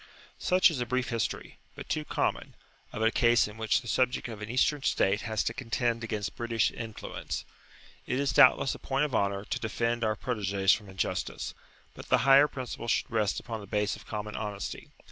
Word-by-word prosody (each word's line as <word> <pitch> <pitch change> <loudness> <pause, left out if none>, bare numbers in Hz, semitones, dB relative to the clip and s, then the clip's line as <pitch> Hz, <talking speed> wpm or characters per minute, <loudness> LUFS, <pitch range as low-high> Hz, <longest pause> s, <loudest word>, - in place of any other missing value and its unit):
Such 185 -1 +4
is 135 -6 -3
a 120 - -2
brief 130 +1 -1
history, 115 -2 -3 0.2
but - - -9
too 155 - -1
common, - - -2 0.4
of 110 - -3
a 110 - +4
case 120 -2 +4
in 105 - -10
which 110 +3 +1
the 120 - -12
subject 125 +2 +1
of 110 -2 -8
an 105 - -6
Eastern 135 +4 +2
state 100 -5 +2
has 110 -2 0
to 115 - -1
contend 120 -1 -1
against 110 -2 -3
British 115 -2 0
influence. 115 -2 -6 0.6
It 130 - 0
is 140 -3 0
doubtless 135 - +6
a - - -9
point 135 +2 0
of 145 - -5
honour 100 -2 0
to - - -3
defend 115 +1 -1
our 110 -1 +1
proteges 100 -6 +1
from 105 -2 -4
injustice, 95 0 -3 0.4
but - - -11
the - - +5
higher 135 +2 +7
principle 125 -4 -6
should 120 - 0
rest 110 -3 +1
upon 115 -2 -6
the 100 - -10
base 105 +1 0
of - - -14
common 105 -1 -5
honesty. 105 -2 -5
115 Hz, 200 wpm, -29 LUFS, 105-125 Hz, 0.6 s, higher